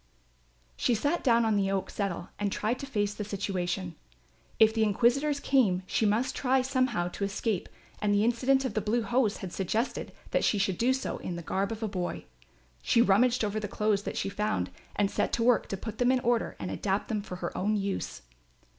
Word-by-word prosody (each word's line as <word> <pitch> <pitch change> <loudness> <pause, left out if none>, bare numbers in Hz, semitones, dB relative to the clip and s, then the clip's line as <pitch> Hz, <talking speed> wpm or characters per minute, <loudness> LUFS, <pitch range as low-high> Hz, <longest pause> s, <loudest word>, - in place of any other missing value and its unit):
She 240 - +2
sat 290 +10 0
down 235 -2 +4
on 220 -1 +2
the 195 -1 +1
oak 195 -1 -1
settle 190 -4 -3
and 205 -1 0
tried 225 +6 -1
to 275 - -6
face 205 -5 -1
the 210 - -5
situation. 185 -3 -2 0.6
If 220 -1 +6
the 225 - 0
inquisitors 250 +8 +2
came 215 -11 +2
she 215 - +1
must 235 +6 +1
try 260 -1 +2
somehow 255 -8 +1
to 200 - -5
escape 200 0 -1 0.3
and 210 - +2
the 205 0 +3
incident 260 +4 +2
of 250 - -2
the 215 - 0
blue 225 +3 0
hose 230 -1 +1
had 175 - -8
suggested 215 +6 -2 0.2
that - - +1
she 210 - +3
should 195 -2 0
do 245 +3 +3
so 260 0 -2
in 175 - -5
the 170 - -6
garb 195 +6 -1
of 225 0 -5
a - - 0
boy. 185 -4 -4 0.6
She 235 - +2
rummaged 235 +3 +3
over 210 +1 -1
the 210 - -3
clothes 210 0 +1
that - - -5
she - - -1
found 195 - -1 0.2
and 200 -1 +1
set - - 0
to 230 - +1
work 240 -1 +3
to 195 - -4
put 220 +2 -7
them 245 0 +4
in 260 - +3
order 240 -1 +1
and - - -5
adapt 195 0 -1
them 215 -2 -1
for 190 -3 -7
her 175 -1 -5
own 210 +3 +1
use. 195 - -3
215 Hz, 215 wpm, -29 LUFS, 195-240 Hz, 0.6 s, If